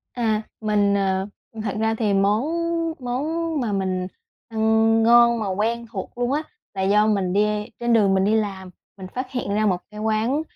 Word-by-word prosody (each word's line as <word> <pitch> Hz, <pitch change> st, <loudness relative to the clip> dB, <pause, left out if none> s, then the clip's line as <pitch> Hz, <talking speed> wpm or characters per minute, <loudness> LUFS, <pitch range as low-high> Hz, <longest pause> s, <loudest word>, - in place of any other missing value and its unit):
À, 220 Hz, -3 st, 0 dB, 0.2 s
mình, 205 Hz, -2 st, +2 dB
ờ 190 Hz, -1 st, 0 dB, 0.4 s
thật 205 Hz, -3 st, -3 dB
ra 220 Hz, 0 st, +1 dB
thì 215 Hz, -3 st, 0 dB
món 200 Hz, +4 st, +2 dB, 0.6 s
món 305 Hz, +6 st, -2 dB
mà 230 Hz, -4 st, -1 dB
mình 185 Hz, -2 st, -1 dB, 0.4 s
ăn 220 Hz, 0 st, +3 dB
ngon 235 Hz, +1 st, +6 dB
mà 215 Hz, -, -2 dB
quen 230 Hz, +4 st, -1 dB
thuộc 195 Hz, +3 st, -7 dB
luôn 245 Hz, +1 st, 0 dB
á, 300 Hz, +2 st, 0 dB, 0.3 s
là 190 Hz, -, -2 dB
do 210 Hz, +2 st, +3 dB
mình 195 Hz, -4 st, +1 dB
đi 210 Hz, +1 st, +1 dB
trên 240 Hz, 0 st, +1 dB
đường 205 Hz, -4 st, +4 dB
mình 190 Hz, 0 st, +2 dB
đi 210 Hz, +2 st, +2 dB
làm 195 Hz, -4 st, -2 dB, 0.3 s
mình 190 Hz, -2 st, -8 dB
phát 255 Hz, +1 st, -4 dB
hiện 245 Hz, -5 st, -3 dB
ra 215 Hz, +1 st, +2 dB
một 190 Hz, -3 st, +2 dB
cái 210 Hz, 0 st, -9 dB
quán, 220 Hz, +7 st, 0 dB
215 Hz, 190 wpm, -23 LUFS, 200-235 Hz, 0.6 s, ngon